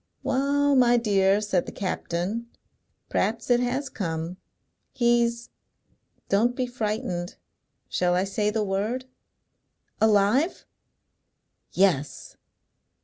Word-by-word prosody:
"Wa'al, 280 +1 +2
my 245 -2 +5
dear," 200 -3 +3
said 200 -4 0
the - - -5
captain, 195 +4 -3 0.6
"p'rhaps 230 +3 0
it 245 - +5
has 255 +3 -1
come. 165 -5 -4 0.6
He's 235 -1 +1 0.8
don't 230 +5 +2
be 255 - -1
frightened 215 -6 -3 0.5
shall 180 0 +1
I 180 - +2
say 205 +2 -1
the 215 0 0
word 210 +6 -2 0.5
" - - -45
"Alive?" 220 - +3 1.1
"Yes!" 175 -7 0
220 Hz, 100 wpm, -25 LUFS, 195-245 Hz, 1.1 s, my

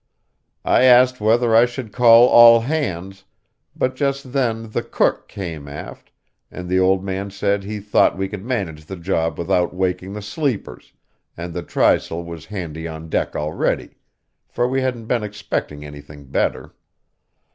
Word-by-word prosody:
I 130 - +4
asked 125 -1 +5
whether 115 +2 +3
I 115 +2 +6
should 120 -2 -7
call 120 -1 +7
all 115 -1 +8
hands, 95 - -3 0.5
but 130 0 -1
just 140 -1 -2
then 115 -5 -1
the - - -1
cook - - 0
came 80 -7 -7
aft, 70 +1 -10 0.4
and 90 0 -8
the 95 +1 +1
old 95 0 +2
man 95 +1 -4
said 100 +1 -1
he 105 +1 -5
thought 105 -1 +2
we 95 0 -2
could 100 -1 -8
manage 95 -11 -4
the 95 - -6
job 85 -3 -2
without 90 +1 0
waking 95 +1 -2
the 105 - -6
sleepers, 120 +2 -4 0.5
and 85 0 -6
the 90 - -4
trysail 85 0 +1
was 85 -2 -9
handy 85 -5 -6
on 80 0 -8
deck - - -1
already, 75 +1 -2 0.5
for 120 - -1
we 130 +1 -1
hadn't 125 -3 -3
been 120 0 0
expecting 105 -8 -5
anything 75 0 -12
better. 65 - -2
100 Hz, 155 wpm, -20 LUFS, 85-120 Hz, 0.5 s, all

